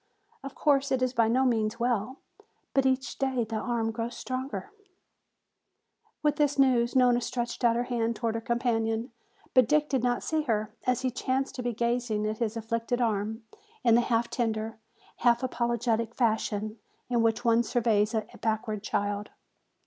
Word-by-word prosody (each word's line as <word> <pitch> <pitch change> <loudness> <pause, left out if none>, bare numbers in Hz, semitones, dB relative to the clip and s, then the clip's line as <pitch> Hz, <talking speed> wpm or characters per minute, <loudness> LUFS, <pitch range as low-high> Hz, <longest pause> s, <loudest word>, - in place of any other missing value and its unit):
Of 275 0 -7
course, 280 -2 +2
it 260 -1 +2
is 255 0 0
by 230 -2 +3
no 255 +4 +3
means 225 -2 +1
well, 240 +1 0 0.6
but 270 -1 +3
each 260 0 -1
day 265 -3 +1
the 220 0 -3
arm 225 0 -1
grows 230 +1 -4
stronger 260 +10 -4 0.8
" - - -46
With 295 -1 +2
this 290 -1 +2
news 250 -3 +3
Nona 245 -1 +4
stretched 240 0 -3
out 235 -1 +4
her 240 - +1
hand 235 -2 -1
toward 230 0 -1
her 225 - -3
companion. 230 0 0 0.4
But 255 -3 +6
Dick 300 0 +3
did 265 -3 +1
not 245 0 0
see 315 -1 0
her, 215 -6 -1
as 250 0 +2
he 260 -1 0
chanced 260 +2 -1
to 250 - -5
be 245 -1 -2
gazing 235 -2 0
at 215 0 -2
his 230 -1 -1
afflicted 230 +2 -2
arm 220 -1 -1 0.4
in 235 - +5
the 235 - +6
half 235 0 +1
tender, 225 -2 -2 0.4
half 235 +1 +3
apologetic 235 -2 0
fashion 215 -2 0 0.3
in 240 -2 +1
which 230 +2 +1
one 230 0 +5
surveys 225 -3 +1
a 215 -1 0 0.2
backward 220 -1 -1
child. 205 0 -2
235 Hz, 170 wpm, -28 LUFS, 225-255 Hz, 0.8 s, But